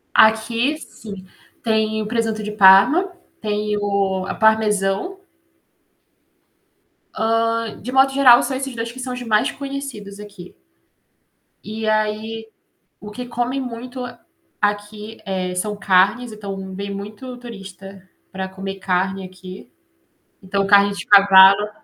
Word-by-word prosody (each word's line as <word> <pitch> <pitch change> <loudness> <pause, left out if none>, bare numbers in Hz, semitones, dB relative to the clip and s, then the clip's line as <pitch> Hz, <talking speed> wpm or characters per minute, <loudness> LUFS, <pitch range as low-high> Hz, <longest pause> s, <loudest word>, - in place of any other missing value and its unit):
Aqui, 230 +6 +3
sim. 200 -10 -11 0.4
Tem 220 -1 0
o - - -5
presunto 225 -1 -2
de 210 0 -5
parma, 210 - +6 0.3
tem 210 0 -2
o 200 -2 -1
ah, - - -4
parmesão. 215 - +1 2.3
Hã, 230 -1 -2
de 250 - -6
modo 265 +1 +4
geral 255 -3 +7
são 265 - -2
esses 270 -1 -5
2 230 0 -4
que 255 - -12
são 255 0 -4
os 250 - -6
mais 215 -2 +1
conhecidos 275 -8 -7
aqui. 205 -3 -12 1.1
E 220 +2 -5
aí, 215 +1 -1 0.5
o 210 - -9
que 250 +4 -7
comem 245 +2 -2
muito 250 +1 -6
a 245 -1 -9 0.4
aqui, 210 +1 -3
eh, 185 -2 -3
são 210 +3 -2
carnes, 205 +4 +2
então 195 -2 -7
vem 200 +1 -5
muito 210 +6 -8
turista 195 -5 -11 0.2
pra 190 0 -5
comer 195 +1 -7
carne 190 +1 -1
aqui. 185 +1 -12 0.7
Então 195 +1 -1
carne 200 0 +5
de 190 -4 -7
cavalo 195 0 +7
210 Hz, 130 wpm, -20 LUFS, 195-235 Hz, 2.3 s, geral